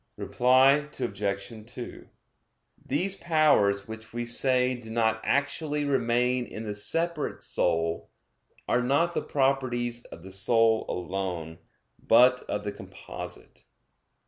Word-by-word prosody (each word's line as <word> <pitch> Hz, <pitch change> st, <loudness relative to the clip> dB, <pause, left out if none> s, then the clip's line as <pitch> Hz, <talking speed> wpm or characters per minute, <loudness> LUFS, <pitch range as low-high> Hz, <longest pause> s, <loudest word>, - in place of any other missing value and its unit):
Reply 130 Hz, +4 st, +4 dB
Obj. 105 Hz, -1 st, -3 dB
2: 125 Hz, 0 st, -9 dB, 0.8 s
These 185 Hz, +8 st, -1 dB
powers, 105 Hz, -12 st, +3 dB
which 110 Hz, 0 st, -9 dB
we 120 Hz, 0 st, -3 dB
say 125 Hz, +1 st, +2 dB
do 120 Hz, -3 st, -9 dB
not 110 Hz, -1 st, +1 dB
actually 145 Hz, +1 st, 0 dB
remain 125 Hz, -2 st, +1 dB
in 110 Hz, -, -7 dB
the 105 Hz, -, -3 dB
separate 165 Hz, +9 st, -2 dB
soul, 85 Hz, -1 st, 0 dB, 0.6 s
are 125 Hz, -, +2 dB
not 145 Hz, +7 st, +2 dB
the -, -, -1 dB
properties 125 Hz, -3 st, 0 dB
of 85 Hz, -, -12 dB
the 95 Hz, -, -10 dB
soul 110 Hz, +3 st, +2 dB
alone, 90 Hz, -3 st, -4 dB, 0.4 s
but 125 Hz, +2 st, +5 dB
of 105 Hz, 0 st, -2 dB
the 105 Hz, -, -3 dB
composite. -, -, -10 dB
120 Hz, 120 wpm, -27 LUFS, 105-135 Hz, 0.8 s, but